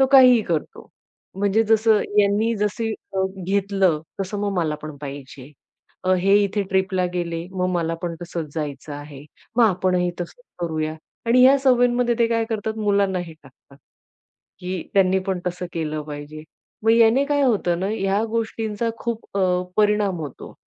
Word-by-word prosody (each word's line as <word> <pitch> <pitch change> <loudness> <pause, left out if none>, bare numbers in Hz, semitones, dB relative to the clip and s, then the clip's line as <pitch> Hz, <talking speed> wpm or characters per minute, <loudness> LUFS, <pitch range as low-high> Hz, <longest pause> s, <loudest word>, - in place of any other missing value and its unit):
तो 265 - +6
काहीही 255 -3 +8
करतो, 165 -5 -3 0.5
म्हणजे 205 +2 +2
जसं 220 0 +4 0.2
यांनी 205 +3 +3
जसं 210 +2 -1 0.2
अ, 190 - +1 0.2
घेतलं. 195 -4 +1 0.2
तसं 195 +2 -3
मग 205 -1 -1
मला 155 -3 0
पण 155 -1 -7
पाहिजे, 140 -1 -9 0.6
हे 195 +2 +3
इथे 200 +1 0
ट्रिपला 190 -1 +1
गेले, 170 -1 -3
मग 185 -1 -1
मला 165 -1 0
पण 170 -1 -3
तसंच 170 -4 -5
जायचं 145 -1 -5
आहे. 145 -1 -10 0.3
मग 240 - +6
आपणही 180 -3 +1
तसंच - - -7 0.2
करूया, 155 -2 -2 0.3
आणि 240 +2 +5
ह्या 270 +2 +7
सवयींमध्ये 245 -2 +3
ते 235 - +4
काय 230 -1 +1
करतात? 220 0 -2
मुलांना 200 -3 +1
हे 175 -2 -6
टाकतात. 140 0 -20 0.8
की 180 -1 -4
त्यांनी 190 -1 +4
पण 190 -2 -1
तसं 180 0 -3
केलं 155 -2 -3
पाहिजे, 150 +1 -8 0.4
मग 225 - +5
याने 230 +4 +5
काय 285 -1 +1
होतं 200 -9 +2
ना? 190 - -1
या 200 -1 0
गोष्टींचा 225 -1 -2
खूप 235 -2 -4
अ, 180 -1 +2
परिणाम 210 -3 +2
होतो, 145 -4 -8
190 Hz, 155 wpm, -22 LUFS, 170-220 Hz, 0.8 s, काहीही